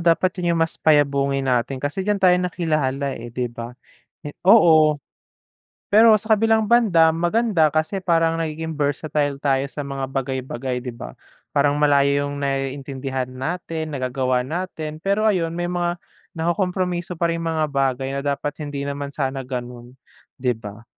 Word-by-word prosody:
dapat 170 +2 +3
'yon 175 -1 +1
yung 165 - 0
mas 165 - -1
payabungin 140 -3 +2
natin 125 +1 0
kasi 145 +7 -2
diyan 205 0 +1
tayo 180 -1 +6
nakilala, 155 -6 -1
eh, 120 +1 -8
'di 125 0 -2
ba? 120 0 -8 0.5
Eh, 145 - -6 0.2
oo. 160 -8 +6 0.9
Pero 220 +2 +7
sa 220 0 +2
kabilang 220 0 +2
banda 205 -9 +5
maganda 175 -3 +2
kasi 160 +5 0
parang 165 -2 +2
nagiging 160 0 -4
versatile 145 -1 -1
tayo 135 -1 +1
sa - - -5
mga 140 -1 -4
bagay-bagay, 130 -1 -3
'di 125 - -4
ba? - - -9 0.3
Parang 145 0 +2
malayo 140 -1 +3
yung 145 0 -5
naiintindihan 135 -1 -3
natin 160 +3 -4
nagagawa 130 -2 -1
natin 155 0 -5
pero 200 +4 0
ayun 180 -6 +2
may 175 - -2
mga 175 0 -1 0.4
nakokompromiso 180 +1 -1
pa 170 0 +1
ring 165 - -3
mga 160 -1 0
bagay 135 -1 0
na 140 - -2
dapat 145 +1 -2
hindi 145 -1 -4
naman 140 0 -4
sana 135 -2 -2
gano'n, 125 -1 -7 0.5
'di 125 -1 +1
ba? 110 0 -10
145 Hz, 155 wpm, -22 LUFS, 135-170 Hz, 0.9 s, Pero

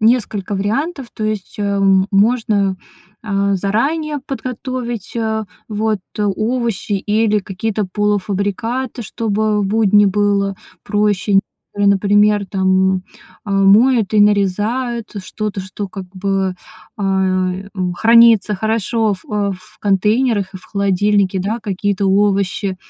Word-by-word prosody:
несколько 215 -3 +1
вариантов. 265 - -2
То 215 - -4
есть, 215 -3 -3
э, 200 -1 0 0.3
можно, 205 -2 +2 0.5
э, 200 -2 0
заранее 285 - -1
подготовить, 250 -3 -5
э, 220 -1 -1 0.2
вот 215 -1 -1 0.2
овощи 215 +1 -1
или 210 +2 +1
какие-то 205 +1 -3
полуфабрикаты, 210 +5 -1
чтобы 215 -1 -1
будни 205 0 +3
было 200 0 +1 0.3
проще. 205 -1 +1 0.3
Которые, 205 0 +2
например, 205 +1 +3
там, 190 0 +2 0.5
э, 205 - -6
моют 210 +3 +4
и 210 - +5
нарезают 210 +4 +1 0.2
что-то, 210 -2 -4
что, 190 +2 -6
как 195 -1 -7
бы, 195 -1 -1 0.4
э, 190 -1 0 0.3
хранится 225 -2 +5
хорошо 220 +1 0
в 185 - -15
э, 205 -1 -1
в 215 +3 -20
контейнерах 210 0 +1
и - - -4
в 185 - -14
холодильнике, 200 -1 +1
да, 215 +5 -2
какие-то 200 -1 -1
овощи. 195 -1 +1
205 Hz, 115 wpm, -17 LUFS, 195-220 Hz, 0.5 s, и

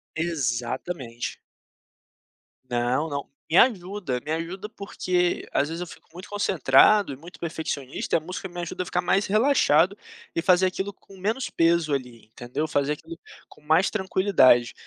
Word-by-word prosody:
Exatamente. 130 -4 -3 1.3
Não, 125 +5 0
não, 140 -1 -4 0.2
me 165 - +3
ajuda 190 - +2
me 150 - -5
ajuda, 170 +6 -4
porque 180 -4 -1
às 145 - +1
vezes 165 +2 -5
eu 180 - -4
fico - - -14
muito 185 +4 -10
concentrado 195 -1 +4
e - - -5
muito 170 +5 -13
perfeccionista 155 -5 -3
e - - +6
a - - -1
música 180 +4 -6
me 175 -1 -8
ajuda 170 +1 -4
a - - -13
ficar 180 - -1
mais 195 +3 +2
relaxado, 200 - +3 0.4
e 165 - +1
fazer 180 +2 +4
aquilo 190 +2 -3
com 195 0 -18
menos 220 +7 -2
peso 165 -2 +2
ali 125 -4 -4
entendeu, 120 +7 -4
fazer 145 0 0
aquilo 165 +2 -10 0.3
com - - -19
mais 160 +5 +3
tranquilidade, 190 - +3
170 Hz, 155 wpm, -25 LUFS, 140-190 Hz, 1.3 s, e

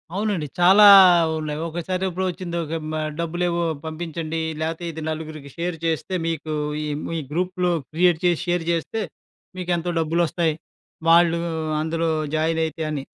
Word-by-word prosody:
అవునండి. 200 -6 -1
చాలా 190 +4 +7 0.5
ఉన్నాయి. 150 -1 -4
ఒకసారెప్పుడు 185 +2 -2
వచ్చింది 175 -1 -4 0.3
మ - - -5 0.3
డబ్బులేవో 170 +1 -1 0.2
పంపించండి 160 0 -4 0.2
లేతే 165 +2 -3
ఇది 160 0 -8
నలుగురికి 155 -2 -6
షేర్ 170 0 -2
చేస్తే 165 +3 -2
మీకు 160 -1 -3 0.3
ఈ - - -3 0.2
మీ 165 - -2
గ్రూప్‌లో 180 +2 0 0.2
క్రియేట్ 170 0 +3
చేసి 175 -2 +2
షేర్ 175 -1 0
చేస్తే 170 +7 -2 0.6
మీకేంతో 175 -1 -1
డబ్బులొస్తాయి. 165 0 0 0.5
వాళ్ళు 170 0 +5 0.4
అందులో 165 +1 -1 0.3
జాయినైతే 160 0 0
అని. 145 -3 -3
165 Hz, 125 wpm, -23 LUFS, 160-175 Hz, 0.6 s, చాలా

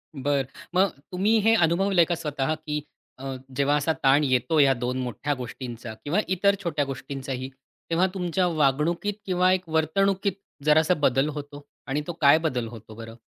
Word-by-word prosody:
बरं. 140 0 0 0.3
मग 190 +2 +4 0.2
तुम्ही 205 +5 +2
हे 225 +2 +4
अनुभवलंय 175 0 +3
का 175 - -1
स्वतः, 150 -2 -2
की 150 -1 -4 0.4
अ, 135 0 -5 0.2
जेव्हा 140 +2 +2
असा 155 +3 +1
ताण 135 +3 +5
येतो, 140 +4 +1
या 140 -2 +6
2 125 +1 -3
मोठ्या 125 +4 -2
गोष्टींचा, 120 -2 -7
किंवा 160 +8 0 0.2
इतर 200 +2 +3
छोट्या 150 -5 0
गोष्टींचाही, 135 -1 -5 0.4
तेव्हा 170 +3 +3
तुमच्या 180 -1 0
वागणुकीत 155 +5 +1
किंवा 185 -1 +2
एक 185 -1 -2
वर्तणुकीत 195 +5 +1 0.3
जरासा 155 +3 +4
बदल 135 +3 +2
होतो 145 0 -8 0.2
आणि 145 +3 -1
तो 175 - -3
काय 145 +1 +7
बदल 125 -5 -2
होतो 110 -1 -11
बरं? 115 0 -9
150 Hz, 160 wpm, -25 LUFS, 135-175 Hz, 0.4 s, काय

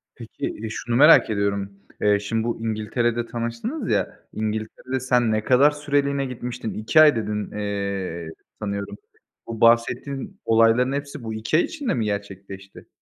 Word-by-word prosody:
Peki, - - -6
e, - - -4
şunu 115 +2 -3
merak 150 +2 +7
ediyorum, 100 -1 -1 0.3
eee, 105 -1 +3
şimdi 110 +2 -2
bu 120 0 -2
İngiltere'de 115 +2 -1
tanıştınız 120 - -4
ya, - - -1
İngiltere'de 110 +4 -3
sen 125 -3 +2
ne 110 0 0
kadar 130 +5 +5
süreliğine 140 -1 0
gitmiştin? 125 -2 -5
2 110 +9 +4
ay 150 -3 +7
dedin, 105 -2 -3
eee, 100 -5 -3 0.3
sanıyorum. 100 -1 -4 0.5
Bu 115 -1 -6
bahsettiğin 135 - +1
olayların 115 +3 +4
hepsi 140 -1 -5
bu 110 -1 -4
2 110 +8 0
ay 170 - +4
içinde 295 -6 -3
mi 115 -3 -1
gerçekleşti? 100 -1 -7
115 Hz, 150 wpm, -23 LUFS, 105-130 Hz, 0.5 s, merak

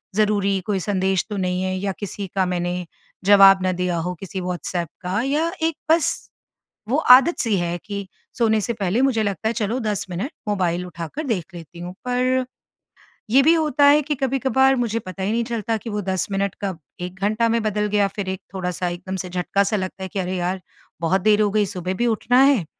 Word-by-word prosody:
ज़रूरी 205 -2 +2
कोई 200 -2 0
संदेश 190 -1 0
तो 205 - -3
नहीं 180 -1 -1
है 185 0 -1
या 195 +1 -1
किसी 205 -1 -5
का 190 -1 +2
मैंने 180 0 -2 0.4
जवाब 195 -1 +7
ना 185 - +2
दिया 180 -1 -1
हो 175 +2 -2
किसी 195 0 -6
व्हाट्सएप 180 -1 -3 0.2
का 185 +4 -1
या 300 +5 0
एक 325 -1 +1 0.2
बस 325 -1 +4 0.8
वो 265 - +2
आदत-सी 255 - +6
है 175 -1 -1
कि 200 -2 -5 0.3
सोने 220 -2 +3
से 235 - -2
पहले 205 +1 0
मुझे 255 -5 +2
लगता 205 +1 -2
है - - -1
चलो 230 +2 -1
10 210 -4 -2
मिनट 195 - -4 0.2
मोबाइल 180 -3 0
उठाकर 175 - -6
देख 190 -7 -2
लेती 170 0 -11
हूँ। 175 +1 -6
पर 255 +1 +1 0.9
ये 270 - +7
भी 320 - +6
होता 300 -3 +2
है 290 +1 +6
कि 295 +1 -2
कभी-कभार 265 0 +2
मुझे 230 -2 0
पता 190 -1 -7
ही 200 - 0
नहीं 235 +1 +1
चलता 225 -1 -2
कि 225 - -8
वो 210 0 -2
10 190 -2 -1
मिनट 195 -1 -1
कब 190 -4 -3 0.2
1 180 +1 -5
घंटा 215 +3 +2
में 230 0 +1
बदल 210 -1 0
गया, 205 -1 +2
फ़िर 195 -1 -5
एक 190 -1 -4
थोड़ा-सा 180 -1 -2
एकदम 180 +2 -5
से 185 - -5
झटका-सा 195 +4 0
लगता 190 0 -5
है - - -3
कि 195 - -4
अरे 185 0 -2
यार! 180 +1 -2 0.4
बहुत 180 +3 +2
देर 215 +1 +4
हो 210 - +3
गई 210 0 +2
सुबह 185 -1 -4
भी 240 +5 0
उठना 245 +3 +3
है, 275 - +4
200 Hz, 210 wpm, -22 LUFS, 185-230 Hz, 0.9 s, जवाब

